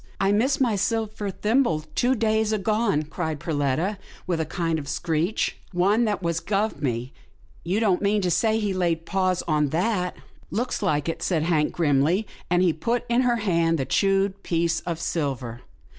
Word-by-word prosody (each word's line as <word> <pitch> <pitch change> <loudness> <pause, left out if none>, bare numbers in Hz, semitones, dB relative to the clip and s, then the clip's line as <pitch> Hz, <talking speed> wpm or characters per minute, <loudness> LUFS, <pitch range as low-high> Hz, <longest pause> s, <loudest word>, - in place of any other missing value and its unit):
" - - -30
I 195 0 +2
missed 235 +7 +2
my 240 -5 +2
silver 215 0 -1
thimble 210 - +1
two 255 +2 +2
days 220 -1 +1
agone," 210 -5 +1
cried 160 -2 -3
Perletta 155 +6 -1 0.3
with 175 -3 -1
a 160 - -3
kind 165 -2 -1
of 140 - -8
screech, 170 +7 -1
" - - -31
one 200 +6 +3
that 205 -3 -1
was 170 -1 0
guv 210 +2 -1
me 125 -1 -2 0.2
— - - -29
you 185 +5 0
don't 200 -5 +2
mean 205 +1 +2
to 180 - +1
say 220 +5 +2
he 205 -3 -1
laid 170 -3 0
paws 185 -2 0
on 150 -3 +2
that?" 180 +3 0 0.2
" - - -28
Looks 245 -1 -2
like 150 -7 0
it," 165 - -3
said 165 -4 0
Hank, 155 -3 +1
grimly, 160 +5 +2 0.2
and 180 +1 +3
he 175 -3 +3
put 230 +10 -1
in 240 +1 +3
her 245 -2 +2
hand 165 -3 +2
the 135 - -1
chewed 195 +5 +1
piece 170 -1 0
of 170 -2 -2
silver. 135 -8 -3
180 Hz, 190 wpm, -25 LUFS, 160-210 Hz, 0.3 s, one